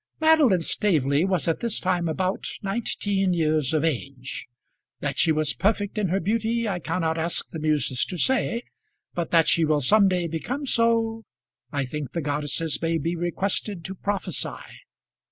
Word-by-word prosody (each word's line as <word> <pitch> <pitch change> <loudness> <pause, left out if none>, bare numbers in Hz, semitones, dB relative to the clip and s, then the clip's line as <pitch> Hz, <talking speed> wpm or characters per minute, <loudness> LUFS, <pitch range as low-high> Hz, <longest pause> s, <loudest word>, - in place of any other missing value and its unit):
Madeline 310 - +5
Staveley 155 -5 +1
was 185 -4 +1
at 165 - +1
this 235 -2 -2
time 180 -2 0
about 185 +4 -1 0.2
nineteen 195 -2 0
years 155 -4 +1
of 155 -1 +1
age. 135 -3 -3 0.5
That - - -3
she 165 - +4
was 155 -1 +1
perfect 205 0 0
in 205 - +1
her 185 +3 +1
beauty 225 +4 0
I 190 -4 -1
cannot 165 -1 -1
ask 165 +1 0
the 160 - -5
muses 150 -4 +1
to 180 - -5
say, 240 +2 +1 0.5
but 170 -2 -2
that 165 -2 +4
she 165 - +4
will 155 -1 +3
some 200 +9 +5
day 180 -2 0
become 245 - -3
so, 230 -2 +2 0.5
I 140 -1 -1
think 140 +1 -5
the 170 - -1
goddesses 145 +1 -1
may 165 0 +1
be 165 +3 -2
requested 175 +1 -2
to 190 - -4
prophesy. 190 -2 -3
175 Hz, 165 wpm, -25 LUFS, 155-205 Hz, 0.5 s, Madeline